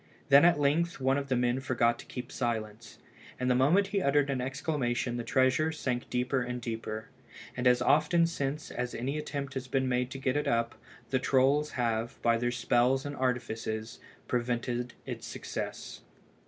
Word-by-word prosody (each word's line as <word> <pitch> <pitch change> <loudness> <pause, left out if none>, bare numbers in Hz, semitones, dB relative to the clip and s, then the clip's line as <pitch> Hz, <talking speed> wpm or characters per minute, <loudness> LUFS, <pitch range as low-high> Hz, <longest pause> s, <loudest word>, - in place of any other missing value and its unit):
Then 140 +3 +8
at 175 -4 +5
length 155 +4 +1
one 135 +1 +2
of 140 0 -6
the 130 - +2
men 120 +1 +1
forgot 120 -2 +1
to - - -11
keep 125 -1 -7
silence, 110 -2 -3 0.4
and 125 0 +1
the - - +5
moment 150 +11 +4
he 200 -1 0
uttered 140 -1 +2
an 130 -2 -1
exclamation 130 -3 -1
the 120 - -3
treasure 130 +6 +2
sank 125 -5 -3
deeper 125 +1 0
and 125 0 -3
deeper, 110 -2 -5 0.5
and 125 0 +1
as 125 0 +4
often 155 +3 +4
since 150 -2 -3
as 125 0 -3
any 135 +6 -2
attempt 140 -2 -4
has 130 -1 -4
been 130 0 0
made 125 0 0
to 135 - -6
get 130 -1 -1
it 145 0 0
up, 115 -3 +1 0.4
the 130 - +2
trolls 140 +3 +2
have, 115 -1 -1
by 115 0 +4
their 120 +1 0
spells 125 +2 +2
and 145 0 -4
artifices, 115 -4 -2 0.3
prevented 120 0 -2
its - - -6
success. - - -6
130 Hz, 180 wpm, -30 LUFS, 120-140 Hz, 0.5 s, Then